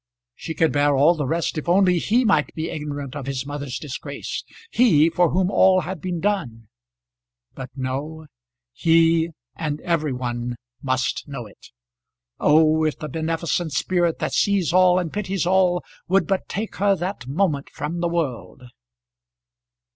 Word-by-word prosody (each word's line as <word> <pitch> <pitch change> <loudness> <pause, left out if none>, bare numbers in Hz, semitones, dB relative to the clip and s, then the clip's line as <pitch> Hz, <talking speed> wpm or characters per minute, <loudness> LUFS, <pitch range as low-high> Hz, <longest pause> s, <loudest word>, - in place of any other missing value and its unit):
She 160 +5 -7
could 160 - +2
bear 145 0 +2
all 145 +5 +5
the 150 -5 -3
rest, 165 +1 -1
if 155 - -6
only 180 -1 +4
he 240 +8 +2
might 185 -8 +2
be 160 +1 -3
ignorant 145 -3 -5
of 140 -3 -6
his 135 -1 -3
mother's 145 -2 -5
disgrace; 140 -1 -6 0.3
he, 165 -10 +4
for 175 0 +3
whom 185 +2 +1
all 185 -2 +5
had 180 -3 -6
been 180 -2 -3
done! 135 - -2 0.8
But 130 -2 -8
no. 140 +4 -4 0.5
He, 165 +3 +3 0.3
and 150 -2 -3
every 165 -4 0
one 120 -1 -3 0.3
must 130 +1 -1
know 135 -5 -6
it. 105 - -16 0.7
Oh! 155 +1 +4
if 155 -1 0
the 155 - -6
beneficent 165 +1 -2
Spirit 175 -3 +1
that 155 -3 -3
sees 195 -5 +2
all 180 -1 +5
and 175 -4 -2
pities 195 -4 -2
all 180 -1 +2 0.2
would 190 -1 +3
but 190 +3 -2
take 210 +4 -4
her 200 +1 +3
that 180 -8 -5
moment 145 -1 0
from 155 +4 -5
the 170 0 0
world! 130 - -3
160 Hz, 155 wpm, -22 LUFS, 145-180 Hz, 0.8 s, all